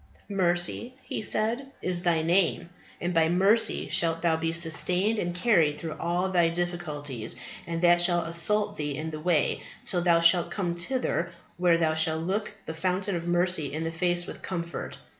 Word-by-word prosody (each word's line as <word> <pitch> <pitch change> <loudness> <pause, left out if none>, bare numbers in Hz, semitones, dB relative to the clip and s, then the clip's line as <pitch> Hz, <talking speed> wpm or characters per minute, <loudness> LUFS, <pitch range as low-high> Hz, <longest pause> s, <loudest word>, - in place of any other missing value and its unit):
Mercy, 185 +5 0
he - - -5
said, 230 +6 -1
is 180 -1 -1
thy 170 -3 +1
name, 175 0 +1 0.3
and 175 +1 -2
by 165 -1 +3
mercy 195 +6 +2
shalt 165 0 +1
thou 165 -2 +3
be 165 0 -2
sustained 180 +5 +1
and 175 -2 -3
carried 170 -8 +2
through 160 -2 -5
all 175 +2 0
thy 175 -2 +3
difficulties 155 -9 -3 0.3
that 175 +1 +3
shall 175 -1 +3
assault 170 +6 +2
thee 145 -2 -3
in 160 +1 -4
the 155 - -6
way, 160 -2 +1 0.2
till 180 - +1
thou 170 -1 +4
shalt 170 +1 +4
come 180 -4 -2
thither 175 -2 -2 0.3
where 175 -1 +3
thou 160 -2 +1
shalt 160 0 +2
look 200 +4 -2
the 160 - -5
Fountain 185 +3 -1
of 170 0 -4
Mercy 175 -3 +1
in 155 +2 -3
the 165 - -3
face 175 +1 0
with - - -9
comfort. 170 -2 -5
175 Hz, 175 wpm, -27 LUFS, 165-180 Hz, 0.3 s, thou